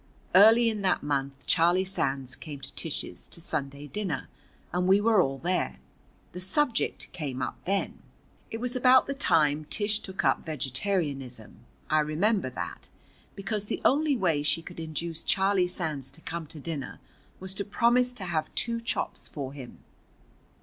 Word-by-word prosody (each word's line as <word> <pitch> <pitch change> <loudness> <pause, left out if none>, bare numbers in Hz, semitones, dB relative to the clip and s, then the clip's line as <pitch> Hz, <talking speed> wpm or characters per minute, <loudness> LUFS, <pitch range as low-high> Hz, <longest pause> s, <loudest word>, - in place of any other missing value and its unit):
Early 220 +5 +8
in 215 -2 0
that 190 - +1
month 140 -1 -2
Charlie 175 +2 +4
Sands 135 -8 -2
came 145 0 -8
to - - -9
Tish's - - -3
to - - -5
Sunday 140 -3 -4
dinner, 175 -3 -3 0.4
and 180 +1 +1
we 195 +2 +6
were 215 -2 +5
all 135 -4 0
there. 165 - -1 0.5
The 180 - -7
subject 240 +8 0
came 145 -7 -4
up - - -4
then. 195 +1 -1 0.5
It 225 - -5
was 245 +1 -2
about 255 +1 +6
the 275 - -2
time 155 - +2
Tish 210 +5 +1
took 190 -3 -4
up - - +3
vegetarianism, 135 - -3 0.3
I 155 - +3
remember 160 - +1
that, 85 -7 -6 0.5
because 205 +1 -3
the - - -2
only 290 0 +4
way 165 -8 +2
she 165 +3 +1
could - - -9
induce 160 +1 -4
Charlie 190 -2 +3
Sands 155 -7 -3
to - - -17
come 165 -1 -5
to 155 - -9
dinner 145 -2 -5 0.4
was 190 0 -2
to 200 - -2
promise 240 +5 +3
to 210 -6 -7
have 160 -3 -1
two 230 0 +1
chops 230 - -2
for 135 -2 -6
him. 130 -4 -10
175 Hz, 165 wpm, -28 LUFS, 145-205 Hz, 0.5 s, Early